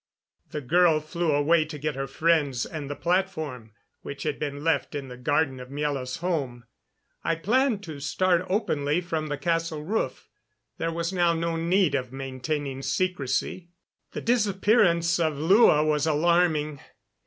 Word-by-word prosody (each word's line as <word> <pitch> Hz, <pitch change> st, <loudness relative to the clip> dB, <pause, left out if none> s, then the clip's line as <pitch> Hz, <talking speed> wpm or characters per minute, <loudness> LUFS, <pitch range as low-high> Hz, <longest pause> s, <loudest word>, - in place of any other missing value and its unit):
The 150 Hz, -, -4 dB
girl 165 Hz, +3 st, +4 dB
flew 165 Hz, +2 st, -2 dB
away 150 Hz, +3 st, +3 dB
to 155 Hz, -1 st, -7 dB
get 150 Hz, +1 st, -2 dB
her 135 Hz, 0 st, -4 dB
friends 145 Hz, -4 st, +1 dB
and 150 Hz, -3 st, -6 dB
the 145 Hz, -, -4 dB
platform, 160 Hz, -, -2 dB, 0.3 s
which 140 Hz, -, -7 dB
had 150 Hz, -2 st, -2 dB
been 145 Hz, -1 st, -4 dB
left 155 Hz, -4 st, 0 dB
in 140 Hz, -2 st, -5 dB
the 125 Hz, -, -8 dB
garden 135 Hz, +1 st, 0 dB
of 125 Hz, 0 st, -9 dB
Miela's 140 Hz, -3 st, -3 dB
home. 135 Hz, -9 st, -2 dB, 0.6 s
I 165 Hz, -, +1 dB
planned 230 Hz, +4 st, +1 dB
to 155 Hz, -5 st, -7 dB
start 175 Hz, +5 st, +1 dB
openly 155 Hz, -6 st, 0 dB
from 160 Hz, -3 st, -3 dB
the 145 Hz, -1 st, -3 dB
castle 165 Hz, -1 st, -1 dB
roof; 210 Hz, +8 st, -2 dB, 0.5 s
there 165 Hz, -, -1 dB
was 170 Hz, +2 st, -3 dB
now 175 Hz, -2 st, +3 dB
no 165 Hz, 0 st, -1 dB
need 170 Hz, 0 st, +2 dB
of 130 Hz, -3 st, -2 dB
maintaining 135 Hz, +1 st, -4 dB
secrecy. 170 Hz, +3 st, -1 dB, 0.4 s
The -, -, -4 dB
disappearance 200 Hz, -6 st, +2 dB
of 160 Hz, -3 st, 0 dB
Lua 160 Hz, -1 st, +5 dB
was 150 Hz, 0 st, +1 dB
alarming. 155 Hz, -2 st, +2 dB
155 Hz, 155 wpm, -26 LUFS, 140-175 Hz, 0.6 s, Lua